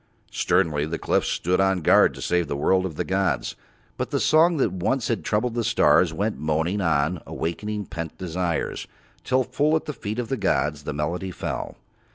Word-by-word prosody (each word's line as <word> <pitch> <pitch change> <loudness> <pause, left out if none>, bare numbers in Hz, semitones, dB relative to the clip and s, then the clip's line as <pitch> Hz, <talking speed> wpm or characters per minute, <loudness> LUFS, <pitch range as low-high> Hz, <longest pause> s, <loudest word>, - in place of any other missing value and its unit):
Sternly 80 -5 +1
the 80 - -7
white - - -3
cliffs - - +1
stood 90 +2 +1
on 95 -3 +1
guard - - +5
to - - -7
save 90 -1 +1
the 70 - -3
world 95 +6 +2
of 80 - -9
the - - -1
gods, 95 -1 -1 0.4
but - - -2
the - - 0
song 165 +2 +4
that 135 - +1
once 115 +7 -1
had 115 - -1
troubled 115 +3 0
the 120 0 -1
stars - - +4
went - - -2
moaning 80 +6 0
on 80 0 +1
awaking 105 +5 -3
pent 85 -3 -6
desires, 90 -2 -2 0.4
till 130 0 +2
full 150 +5 +1
at 160 - -1
the 150 - -4
feet 105 -3 -5
of 120 -2 -3
the 135 - -1
gods 75 -8 0
the - - -3
melody 85 +6 -2
fell. 90 - -5
90 Hz, 200 wpm, -24 LUFS, 80-110 Hz, 0.4 s, guard